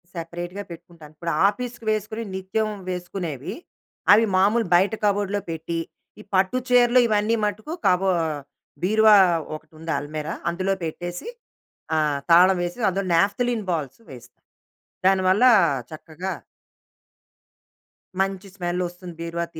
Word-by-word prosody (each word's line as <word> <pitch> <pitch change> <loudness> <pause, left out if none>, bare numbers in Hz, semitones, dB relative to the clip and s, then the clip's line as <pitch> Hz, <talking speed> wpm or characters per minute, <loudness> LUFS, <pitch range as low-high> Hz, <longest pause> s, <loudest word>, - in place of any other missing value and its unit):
సెపరేట్‌గా 175 +3 -6
పెట్టుకుంటాను. 165 -2 -13
ఇప్పుడు 170 +2 -3 0.2
ఆఫీస్‌కి 240 +2 -4
వేసుకొనేవి 215 0 -3
నిత్యం 200 +3 -2 0.2
వేసుకునేవి. 175 -6 -5 0.6
అవి 220 +2 +5
మామూలుగా 205 0 +2
బయట 195 +5 +3
కబోర్డ్‌లో 205 0 0
పెట్టి, 165 +1 -4 0.4
ఈ - - -13
పట్టు 190 +6 +2
చీరలు 245 0 +5
ఇవన్నీ 215 +1 +2
మటుకు 215 - -4
కబో 185 +1 +3 0.7
బీరువా 215 +2 +6 0.4
ఒకటుంది 160 +1 -8
అల్మేరా. 150 +2 -5 0.2
అందులో 185 +3 -1
పెట్టేసి 175 - -6 0.7
ఆహ్, 150 -2 +1
తాళం 180 +3 +7
వేసి 175 +6 -5
అందులో 195 +1 -2
నాప్థలిన్ 220 +5 +1
బాల్స్ 155 - -3
వేస్తాం. 125 -1 -14 0.6
దాని 190 0 +4
వల్ల 200 +6 +3 0.5
చక్కగా... 160 +4 -6 1.9
మంచి 195 0 -1
స్మెల్ 180 -1 -2
వస్తుంది 175 0 -11
బీరువా 170 0 -3
తి - - -8
185 Hz, 115 wpm, -23 LUFS, 170-210 Hz, 1.9 s, తాళం